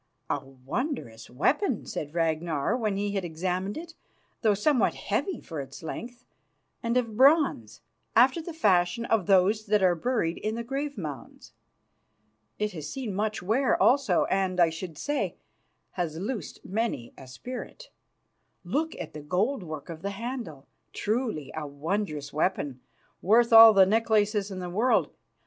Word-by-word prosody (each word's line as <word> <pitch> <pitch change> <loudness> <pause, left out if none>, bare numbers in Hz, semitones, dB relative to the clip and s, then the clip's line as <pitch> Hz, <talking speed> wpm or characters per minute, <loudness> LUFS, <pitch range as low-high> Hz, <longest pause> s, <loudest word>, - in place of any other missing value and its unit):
"A 145 - -1
wondrous 135 - -5
weapon," 255 - 0
said 150 +2 -6
Ragnar 160 0 0
when 215 -5 -1
he 205 0 -1
had 195 -2 -2
examined 180 +4 -3
it, 335 +1 -8 0.5
"though 215 -3 +3
somewhat 255 +5 +2
heavy 385 -3 -2
for 160 -4 -6
its 135 +3 -10
length, 240 +9 -7 0.6
and 235 0 0
of 230 -4 -1
bronze, 270 - +3 0.3
after 260 +8 +5
the 345 - -7
fashion 210 - +2
of 225 -5 +1
those 205 +3 +3
that 210 -1 +3
are 180 -1 +5
buried 175 -2 -1
in 215 +1 -2
the 235 - -4
grave 275 +2 -4
mounds. 150 -7 -8 1.0
It 210 0 -1
has 155 -5 -7
seen 250 -7 -4
much 210 -1 -2
wear 235 +8 +2
also, 255 -9 +4
and, 190 -1 0
I 170 -2 +5
should 165 -1 -7
say, 290 - -2 0.6
has 165 -4 -3
loosed 210 +5 -5
many 210 - -2
a 130 - -12
spirit. 250 - -8 0.7
Look 315 +3 -1
at - - -7
the 150 - -7
gold 200 - 0
work 155 -5 -7
of 165 -1 -7
the 200 - -2
handle. 205 - -6 0.3
Truly 215 - -2
a 155 -1 -4
wondrous 150 0 -3
weapon, 145 -5 -1 0.4
worth 230 +4 +4
all 225 0 +11
the 195 -3 +6
necklaces 210 -1 +2
in 190 - -6
the 180 -1 -4
world. 225 +8 +2
200 Hz, 155 wpm, -27 LUFS, 165-235 Hz, 1.0 s, all